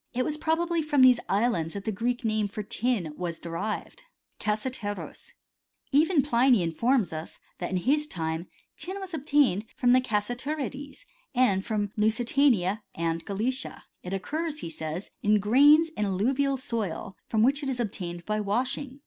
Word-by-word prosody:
It 255 Hz, 0 st, +1 dB
was 300 Hz, -, -1 dB
probably 330 Hz, +2 st, 0 dB
from 295 Hz, -3 st, +3 dB
these 250 Hz, -2 st, +7 dB
islands 195 Hz, -6 st, +1 dB
^hat 200 Hz, -, -5 dB
the 220 Hz, -, -1 dB
Greek 240 Hz, +4 st, -2 dB
name 215 Hz, -1 st, +1 dB
for 210 Hz, +1 st, -6 dB
tin 205 Hz, -7 st, -1 dB
was 170 Hz, -1 st, -4 dB
derived 170 Hz, -, -5 dB, 0.4 s
(icacrffircpoc). 210 Hz, -1 st, -4 dB, 0.6 s
Even 305 Hz, +1 st, +4 dB
Pliny 245 Hz, -6 st, +4 dB
informs 200 Hz, +3 st, +1 dB
us, 155 Hz, +1 st, -7 dB, 0.2 s
that 175 Hz, -, -3 dB
in 185 Hz, -, 0 dB
his 295 Hz, +10 st, +1 dB
time 160 Hz, -, -3 dB, 0.3 s
tin 380 Hz, +2 st, -6 dB
was 385 Hz, -2 st, -7 dB
ob^ 305 Hz, -4 st, -5 dB
tained 275 Hz, -9 st, +3 dB
from 245 Hz, -1 st, +3 dB
the 255 Hz, -, +5 dB
Cassiterides, 265 Hz, -, -3 dB, 0.3 s
and 205 Hz, -7 st, +3 dB
from 205 Hz, -2 st, -2 dB
Lusitaoia 220 Hz, -2 st, +2 dB
and 165 Hz, 0 st, -1 dB
Gallicia. 235 Hz, +6 st, -3 dB, 0.2 s
It 180 Hz, -, -7 dB
occurs, 300 Hz, -, -3 dB
he -, -, -5 dB
says, 160 Hz, +3 st, -5 dB
in 210 Hz, 0 st, +3 dB
grains 290 Hz, +10 st, +6 dB
in 210 Hz, -9 st, -2 dB
alluvial 260 Hz, +8 st, +1 dB
soil, 215 Hz, -7 st, -4 dB
from 220 Hz, -1 st, +2 dB
which 280 Hz, +4 st, +3 dB
it 275 Hz, -, -2 dB
is 255 Hz, -2 st, -3 dB
obtained 175 Hz, -6 st, -4 dB
by 215 Hz, 0 st, -1 dB
washing. 255 Hz, +6 st, -2 dB
230 Hz, 160 wpm, -27 LUFS, 195-275 Hz, 0.6 s, these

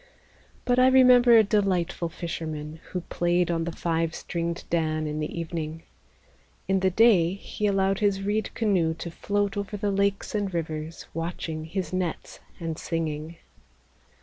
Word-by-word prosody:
But 245 Hz, 0 st, +3 dB
I 255 Hz, -, +6 dB
remember 250 Hz, -2 st, +7 dB
a 220 Hz, -, +7 dB
delightful 190 Hz, -5 st, 0 dB
fisherman 160 Hz, -2 st, -5 dB
Who 180 Hz, -, -3 dB
played 175 Hz, 0 st, 0 dB
on 165 Hz, -1 st, 0 dB
the 170 Hz, -, -3 dB
five 165 Hz, -1 st, -1 dB
stringed 170 Hz, 0 st, -3 dB
dan 155 Hz, -2 st, 0 dB
in 150 Hz, 0 st, -3 dB
the 155 Hz, +2 st, -3 dB
evening. 160 Hz, -1 st, -4 dB, 0.8 s
In 190 Hz, 0 st, +2 dB
the 190 Hz, 0 st, +3 dB
day 185 Hz, -4 st, +4 dB
he 210 Hz, +1 st, -3 dB
allowed 195 Hz, -1 st, +1 dB
his 200 Hz, -2 st, +1 dB
reed 210 Hz, +1 st, 0 dB
canoe 185 Hz, -8 st, +1 dB
to 170 Hz, +1 st, -6 dB
float 205 Hz, +3 st, -1 dB
Over 205 Hz, +1 st, -3 dB
the 205 Hz, 0 st, -1 dB
lakes 200 Hz, 0 st, 0 dB
and 205 Hz, -2 st, -1 dB
rivers, 160 Hz, -1 st, -4 dB
Watching 165 Hz, -1 st, -4 dB
his 180 Hz, 0 st, -4 dB
nets 180 Hz, -3 st, -3 dB, 0.2 s
and 165 Hz, -2 st, -4 dB
singing. 160 Hz, -1 st, -3 dB
175 Hz, 150 wpm, -26 LUFS, 165-200 Hz, 0.8 s, remember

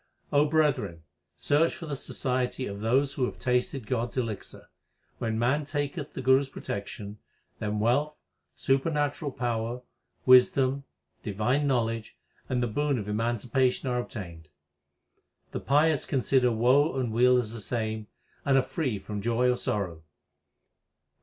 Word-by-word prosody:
brethren, 145 Hz, -, +1 dB, 0.3 s
search 155 Hz, +3 st, +2 dB
for 170 Hz, -, -8 dB
the 150 Hz, -3 st, -3 dB
society 130 Hz, -1 st, -2 dB
of 100 Hz, -2 st, -6 dB
those 135 Hz, +5 st, +2 dB
who 130 Hz, -3 st, 0 dB
have -, -, -5 dB
tasted 125 Hz, 0 st, 0 dB
God 120 Hz, 0 st, -1 dB
s -, -, -11 dB
elixir. 115 Hz, -5 st, -4 dB, 0.5 s
When 115 Hz, -2 st, -1 dB
man 130 Hz, +6 st, +2 dB
taketh 145 Hz, +1 st, -3 dB
the 135 Hz, -, -5 dB
Guru 130 Hz, +1 st, +6 dB
s 140 Hz, -, -4 dB
protection, 100 Hz, -3 st, -6 dB, 0.4 s
then 105 Hz, 0 st, -2 dB
wealth, 140 Hz, +8 st, +1 dB, 0.4 s
supernatural 145 Hz, +2 st, 0 dB
power, 120 Hz, 0 st, -2 dB, 0.4 s
wisdom, 130 Hz, +2 st, +5 dB, 0.4 s
divine 120 Hz, +8 st, 0 dB
knowledge, 115 Hz, -4 st, -1 dB, 0.3 s
and 125 Hz, -1 st, 0 dB
the -, -, +1 dB
boon 145 Hz, +5 st, 0 dB
of 105 Hz, -3 st, -4 dB
emancipation 120 Hz, +4 st, 0 dB
are 125 Hz, 0 st, 0 dB
obtained. 85 Hz, -10 st, -7 dB, 1.0 s
The -, -, -3 dB
pious 150 Hz, +2 st, +3 dB
consider 130 Hz, -2 st, +2 dB
woe 130 Hz, +6 st, +3 dB
and 125 Hz, -3 st, -1 dB
weal 125 Hz, +2 st, +5 dB
as 115 Hz, -3 st, -1 dB
the 115 Hz, -, -5 dB
same, 110 Hz, -1 st, -3 dB, 0.4 s
and 135 Hz, -1 st, +3 dB
are 135 Hz, -, +4 dB
free 140 Hz, -, -2 dB
from 105 Hz, +1 st, -6 dB
joy 120 Hz, +3 st, +2 dB
or -, -, +1 dB
sorrow. 90 Hz, -9 st, -2 dB
125 Hz, 140 wpm, -28 LUFS, 110-135 Hz, 1.0 s, Guru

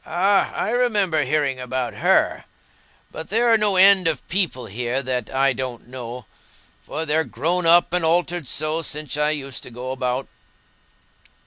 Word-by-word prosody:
"Ah, 195 Hz, +4 st, +1 dB
I -, -, -2 dB
remember 205 Hz, -10 st, +1 dB
hearing 140 Hz, -1 st, 0 dB
about 125 Hz, 0 st, -3 dB
her. -, -, +1 dB, 0.7 s
But 160 Hz, -, -8 dB
there 230 Hz, +3 st, +3 dB
are -, -, +6 dB
no 205 Hz, -2 st, +1 dB
end 190 Hz, -1 st, +6 dB
of 160 Hz, -, -2 dB
people 175 Hz, -8 st, -1 dB
here 125 Hz, +5 st, -3 dB
that 125 Hz, -3 st, -3 dB
I 135 Hz, 0 st, +2 dB
don't 125 Hz, -1 st, -6 dB
know, 125 Hz, -1 st, -8 dB, 0.6 s
for 160 Hz, +2 st, -5 dB
they're 160 Hz, +1 st, +1 dB
grown 165 Hz, +7 st, -1 dB
up 170 Hz, +1 st, +5 dB
and 180 Hz, -1 st, +1 dB
altered 170 Hz, -1 st, +1 dB
so 155 Hz, +4 st, 0 dB
since 150 Hz, -1 st, -3 dB
I 150 Hz, 0 st, +1 dB
used 140 Hz, -4 st, -3 dB
to -, -, -9 dB
go 125 Hz, +2 st, -6 dB
about." 130 Hz, 0 st, -2 dB
150 Hz, 160 wpm, -22 LUFS, 130-175 Hz, 0.7 s, are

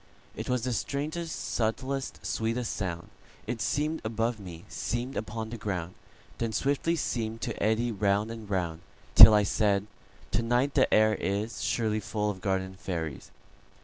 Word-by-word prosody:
It -, -, -5 dB
was 125 Hz, -2 st, +1 dB
the 125 Hz, -1 st, 0 dB
strangest, 155 Hz, +7 st, -3 dB
subtlest, 130 Hz, +4 st, -2 dB
sweetest 115 Hz, +2 st, -1 dB
sound:It 100 Hz, +5 st, -6 dB
seem'd 150 Hz, +8 st, 0 dB
above 115 Hz, +1 st, -1 dB
me, 90 Hz, -4 st, -9 dB
seem'd 120 Hz, +3 st, -3 dB
upon 110 Hz, +1 st, -4 dB
the 120 Hz, -, -6 dB
ground, 90 Hz, -4 st, -3 dB, 0.5 s
Then 115 Hz, -1 st, -1 dB
swiftly 145 Hz, +7 st, +1 dB
seem'd 115 Hz, -7 st, -2 dB
to 115 Hz, -, -4 dB
eddy 110 Hz, +3 st, +2 dB
round 105 Hz, +1 st, +1 dB
and 110 Hz, -3 st, -8 dB
round, 85 Hz, -4 st, -1 dB, 0.3 s
Till 110 Hz, -, +11 dB
I 105 Hz, -, +4 dB
said: 100 Hz, -1 st, +1 dB, 0.5 s
"To 100 Hz, -, +2 dB
night 120 Hz, +4 st, +1 dB
the -, -, +3 dB
air 110 Hz, 0 st, +5 dB
isSurely 110 Hz, +1 st, -1 dB
full 105 Hz, 0 st, -1 dB
of 95 Hz, -2 st, -10 dB
garden 95 Hz, -1 st, -1 dB
fairies." 80 Hz, -7 st, -5 dB
110 Hz, 145 wpm, -29 LUFS, 100-120 Hz, 0.5 s, Till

